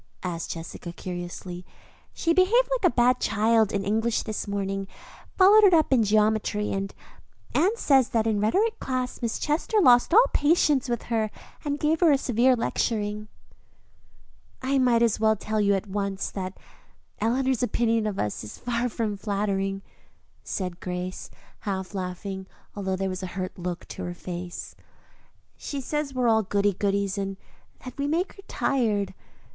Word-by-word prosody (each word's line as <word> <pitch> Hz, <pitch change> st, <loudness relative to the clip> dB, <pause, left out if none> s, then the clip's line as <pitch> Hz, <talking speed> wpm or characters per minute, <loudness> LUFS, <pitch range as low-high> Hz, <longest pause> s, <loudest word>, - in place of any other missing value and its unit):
asked 170 Hz, -2 st, -4 dB
Jessica 165 Hz, +1 st, -6 dB
curiously. 175 Hz, 0 st, -6 dB, 0.5 s
"She 335 Hz, -, 0 dB
behaved 420 Hz, +8 st, +4 dB
like 455 Hz, -9 st, +3 dB
a -, -, -25 dB
bad 250 Hz, +1 st, +4 dB
child 220 Hz, 0 st, +2 dB
in 200 Hz, -1 st, -2 dB
English 220 Hz, +3 st, +1 dB
this 215 Hz, -2 st, -4 dB
morning, 195 Hz, -1 st, -2 dB, 0.5 s
followed 405 Hz, +3 st, +7 dB
it 380 Hz, -4 st, +7 dB
up 310 Hz, -4 st, +3 dB
in 250 Hz, -, +5 dB
geometry; 210 Hz, 0 st, +1 dB
and 195 Hz, 0 st, -2 dB, 0.6 s
Anne 390 Hz, +7 st, +3 dB
says 270 Hz, -, +4 dB
that 225 Hz, -4 st, +1 dB
in 220 Hz, -2 st, +1 dB
rhetoric 405 Hz, -, +1 dB
class 255 Hz, -1 st, -3 dB
Miss 235 Hz, -2 st, -1 dB
Chester 320 Hz, +9 st, 0 dB
lost 245 Hz, -7 st, +5 dB
all 455 Hz, +7 st, +7 dB
patience 290 Hz, -4 st, +3 dB
with 240 Hz, -1 st, -1 dB
her 220 Hz, -1 st, +1 dB, 0.3 s
and 290 Hz, 0 st, -2 dB
gave 310 Hz, +2 st, +1 dB
her 340 Hz, -3 st, +5 dB
a 280 Hz, -, +5 dB
severe 250 Hz, 0 st, +3 dB
lecturing." 210 Hz, -2 st, -1 dB, 1.4 s
"I 270 Hz, +1 st, +2 dB
might 240 Hz, -2 st, +4 dB
as 225 Hz, -3 st, +2 dB
well 220 Hz, 0 st, +4 dB
tell 215 Hz, +1 st, -2 dB
you 200 Hz, -1 st, +3 dB
at 195 Hz, -, -2 dB
once 200 Hz, -1 st, -3 dB
that 185 Hz, -1 st, -5 dB, 0.6 s
Eleanor's 255 Hz, +2 st, +1 dB
opinion 230 Hz, -2 st, +1 dB
of 200 Hz, -2 st, -3 dB
us 105 Hz, 0 st, -2 dB
is 105 Hz, -, -9 dB
far 245 Hz, 0 st, -1 dB
from 220 Hz, -2 st, -2 dB
flattering," 195 Hz, -1 st, -2 dB, 0.6 s
said 180 Hz, -3 st, -4 dB
Grace, 180 Hz, 0 st, -5 dB, 0.3 s
half 190 Hz, -1 st, -4 dB
laughing, 190 Hz, 0 st, -5 dB, 0.3 s
although 190 Hz, -2 st, -2 dB
there 195 Hz, +1 st, -2 dB
was 185 Hz, 0 st, -4 dB
a 185 Hz, -, -4 dB
hurt 185 Hz, -1 st, -3 dB
look 180 Hz, -1 st, -5 dB
on -, -, -3 dB
her 175 Hz, -, -5 dB
face. 175 Hz, 0 st, -7 dB, 0.8 s
"She 285 Hz, -, -5 dB
says 285 Hz, 0 st, -3 dB
we 255 Hz, -, 0 dB
are -, -, +3 dB
all 220 Hz, -1 st, +4 dB
goody 200 Hz, 0 st, +1 dB
goodies 200 Hz, +1 st, 0 dB
and 195 Hz, -1 st, -3 dB, 0.5 s
that 255 Hz, -, -7 dB
we 280 Hz, -, 0 dB
make 335 Hz, +5 st, 0 dB
her 395 Hz, -, -14 dB
tired. 215 Hz, -7 st, 0 dB
215 Hz, 165 wpm, -26 LUFS, 195-260 Hz, 1.4 s, followed